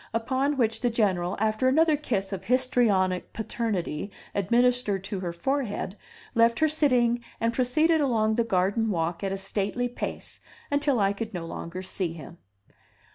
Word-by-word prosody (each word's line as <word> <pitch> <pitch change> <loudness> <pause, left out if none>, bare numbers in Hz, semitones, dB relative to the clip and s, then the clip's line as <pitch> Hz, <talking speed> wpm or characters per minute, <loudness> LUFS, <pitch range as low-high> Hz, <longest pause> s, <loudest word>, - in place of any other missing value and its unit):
Upon 265 +5 0
which 225 -3 +1
the 245 - +2
General, 195 -5 0
after 220 +4 +1
another 315 +4 +4
kiss 205 -9 -2
of 190 -1 -5
histrionic 220 -7 +2
paternity 210 -6 -3 0.2
administered 235 -1 +2
to 200 -1 -4
her 180 -2 -3
forehead, 210 +1 -2 0.4
left 230 0 +4
her 315 - +3
sitting 250 -6 +2 0.2
and 230 0 +1
proceeded 310 +7 +2
along 220 -6 +2
the 235 +1 +2
garden 205 +2 +1
walk 170 -1 -1
at 195 - -1
a 195 - -2
stately 200 +5 -2
pace, 245 - -6 0.3
until 285 -3 +2
I 200 0 +2
could 220 0 -5
no 170 -2 -4
longer 170 +2 -6
see 185 -2 -3
him. 165 +1 -11
225 Hz, 155 wpm, -27 LUFS, 190-250 Hz, 0.4 s, another